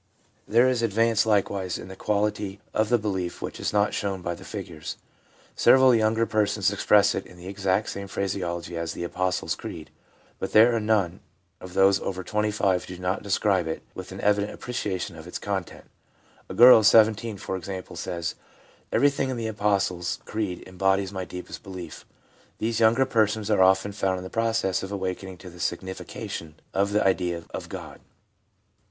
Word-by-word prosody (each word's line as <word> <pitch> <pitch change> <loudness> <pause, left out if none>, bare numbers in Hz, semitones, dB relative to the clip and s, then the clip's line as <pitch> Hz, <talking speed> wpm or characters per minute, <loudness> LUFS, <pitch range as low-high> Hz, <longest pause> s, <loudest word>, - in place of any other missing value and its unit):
There 120 +4 +5
is 125 -2 +1
advance 115 0 +2
likewise 100 -3 +1
in - - -9
the 95 - -9
quality 105 -1 -1
of 110 0 +1
the 120 - +4
belief 95 -5 -3
which - - -6
is - - -1
not 105 0 +2
shown 95 -3 -2
by 85 - -2
the - - -11
figures. 80 -3 -7 0.6
Several 130 0 +6
of - - +6
the 115 - +4
younger 110 +1 +2
persons 105 -3 +1
express 100 0 +4
it 95 - -4
in 90 - -15
the 90 +1 -10
exact 100 +1 0 0.2
phrase 100 -1 -2
ology 85 -1 -4
of 85 0 -3
the - - -4
Apostles' 90 +1 -1
Creed; - - -8 0.5
but - - -4
there 115 +2 +7
are - - +1
none 105 -5 +1 0.4
of 90 -1 -10
those 95 0 +5
over 95 -1 -4
25 105 -3 0
who 90 - -8
do - - -12
not 90 +2 -1
describe 100 -3 +1
it 80 - -4
with - - -8
an - - -8
evident 105 0 +2
appreciation 100 -8 -4
of 80 +1 -11
its 90 - -5
content. 95 -3 -4 0.6
A - - -6
girl 120 0 +9
of 110 - +4
17, 110 -1 +4
for 95 - -4
example, 95 0 -6
says: 85 -2 -3 0.3
' - - -31
Everything 140 -1 +2
in 130 - -2
the 115 - -3
Apostles' 100 -4 0
Creed 105 -5 -3
embodies 95 +1 +1
my 95 -2 -4
deepest 90 +2 -8
belief/ 90 -4 -9 0.5
These 115 +1 -1
younger 115 +4 +4
persons 110 -2 +1
are 105 - +4
often 95 +2 +4
found 95 -2 -1
in 90 - -6
the 95 - -8
process 115 -4 0
of 95 - -6
awakenings 95 -2 -4
to 90 - -10
the 90 - -14
signification 85 -3 -5 0.2
of 100 +1 +1
the 105 0 +2
idea 90 -3 +1
of - - -6
God. - - -8
100 Hz, 185 wpm, -26 LUFS, 95-110 Hz, 0.6 s, girl